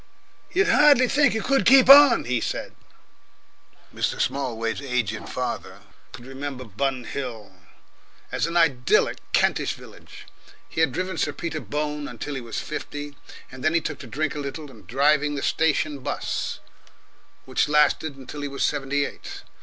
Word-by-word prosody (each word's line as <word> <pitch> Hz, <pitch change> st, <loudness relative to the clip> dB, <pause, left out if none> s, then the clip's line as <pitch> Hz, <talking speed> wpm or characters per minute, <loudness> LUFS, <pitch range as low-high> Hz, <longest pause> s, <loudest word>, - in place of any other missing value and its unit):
"You'd 390 Hz, +3 st, +2 dB
hardly 290 Hz, -9 st, +5 dB
think 280 Hz, -3 st, +3 dB
it 220 Hz, -, -2 dB
could 275 Hz, 0 st, +2 dB
keep 260 Hz, 0 st, +6 dB
on," 275 Hz, -3 st, +9 dB
he 120 Hz, -1 st, -1 dB
said. -, -, -4 dB, 1.2 s
Mr. -, -, -2 dB
Smallways' 115 Hz, -4 st, -2 dB
aged 125 Hz, -6 st, -2 dB
father, -, -, -5 dB, 0.3 s
could 120 Hz, -, -11 dB
remember 135 Hz, 0 st, -6 dB
Bun 130 Hz, +4 st, -2 dB
Hill 120 Hz, -7 st, -6 dB, 0.8 s
as -, -, 0 dB
an 170 Hz, +1 st, -2 dB
idyllic 140 Hz, -7 st, +2 dB
Kentish -, -, +1 dB
village. -, -, -14 dB, 0.4 s
He 160 Hz, -, -3 dB
had 160 Hz, -4 st, +3 dB
driven 185 Hz, +4 st, -3 dB
Sir -, -, 0 dB
Peter 160 Hz, -2 st, -4 dB
Bone 150 Hz, 0 st, -4 dB
until 125 Hz, +4 st, -6 dB
he 135 Hz, -, -4 dB
was 115 Hz, -1 st, -7 dB
fifty 145 Hz, -1 st, -6 dB, 0.4 s
and 130 Hz, 0 st, -10 dB
then 155 Hz, +2 st, +2 dB
he -, -, +5 dB
took -, -, -5 dB
to 130 Hz, -, -9 dB
drink 145 Hz, +6 st, -2 dB
a 150 Hz, -, -5 dB
little, 145 Hz, +1 st, -6 dB
and 105 Hz, -7 st, -17 dB
driving 145 Hz, +4 st, +2 dB
the 140 Hz, -, -4 dB
station 150 Hz, -2 st, 0 dB
bus, -, -, -4 dB, 0.8 s
which -, -, 0 dB
lasted 150 Hz, 0 st, +2 dB
him 135 Hz, -, -13 dB
until 145 Hz, +3 st, -8 dB
he 145 Hz, -, -3 dB
was 140 Hz, -1 st, -1 dB
seventy 145 Hz, 0 st, 0 dB
eight. -, -, -9 dB
145 Hz, 160 wpm, -24 LUFS, 130-160 Hz, 1.2 s, on